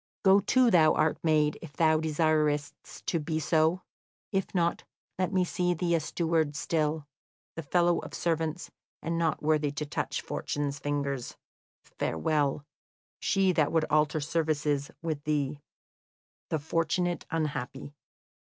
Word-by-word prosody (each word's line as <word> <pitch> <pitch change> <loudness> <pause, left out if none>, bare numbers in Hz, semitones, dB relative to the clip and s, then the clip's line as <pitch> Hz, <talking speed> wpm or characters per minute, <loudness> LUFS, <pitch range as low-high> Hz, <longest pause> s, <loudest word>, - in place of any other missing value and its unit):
Go 195 +1 +7
to, 250 +4 +3
thou 160 -4 +5
art 155 0 +1
made, 155 -2 +2
if 160 -4 -10
thou 160 0 +3
desirest 155 -2 +1 0.3
to 170 - 0
be 155 +1 -2
so; 160 +3 +2 0.5
if 195 0 -2
not, 170 -1 +1 0.4
let 185 0 0
me 185 -2 +2
see 180 0 0
thee 170 +1 0
a 165 - +3
steward 160 -1 0
still, 155 -1 -1 0.5
the 165 - -4
fellow 175 +3 +2
of - - -8
servants, 165 0 -2 0.3
and 165 +1 -1
not 165 -2 0
worthy 150 -1 +2
to 150 +1 -3
touch 145 - -3
Fortune's 145 -1 -3
fingers. 140 -3 -3 0.5
Farewell. 145 - -1 0.5
She 195 -2 +2
that 155 -4 +2
would 160 -1 +2
alter 150 +1 +3
services 150 -2 0
with 155 -3 -3
thee, 145 -1 -1 0.9
"THE 160 - +1
FORTUNATE 165 +3 -1
UNHAPPY." 145 -3 -3
155 Hz, 135 wpm, -29 LUFS, 150-170 Hz, 0.9 s, Go